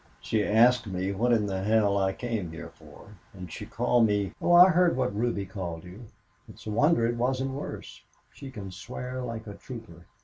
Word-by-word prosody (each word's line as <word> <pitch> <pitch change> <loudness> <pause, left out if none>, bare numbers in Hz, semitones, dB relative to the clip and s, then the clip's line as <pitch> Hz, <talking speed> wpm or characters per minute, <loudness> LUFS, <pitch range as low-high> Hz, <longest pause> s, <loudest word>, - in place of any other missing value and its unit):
"She 110 -2 0
asked 115 +3 +4
me 95 0 -2
what 115 +5 0
in 110 -3 +3
the 95 -2 -3
hell 105 0 +2
I 95 -1 +1
came 110 -6 -4
here 85 +1 -8
for. 80 +7 -16 0.2
And 90 -3 -9
she - - -7
called 120 -2 +2
me 105 -2 -1
" - - -36
"Oh, 175 - +3
I 180 +2 +9
heard 180 -3 +3
what 125 -6 -1
Ruby 110 -3 -1
called 90 -4 -6
you. 95 +6 -11 0.4
It's - - -14
a 110 - -4
wonder 145 +2 +3
it 120 +1 -1
wasn't 130 +2 0
worse. 140 +2 -7 0.3
She 135 - -10
can 100 -7 -8
swear 125 +5 -6
like 115 -2 -6
a 105 - -8
trooper. 100 -8 -11
110 Hz, 205 wpm, -27 LUFS, 95-125 Hz, 0.4 s, I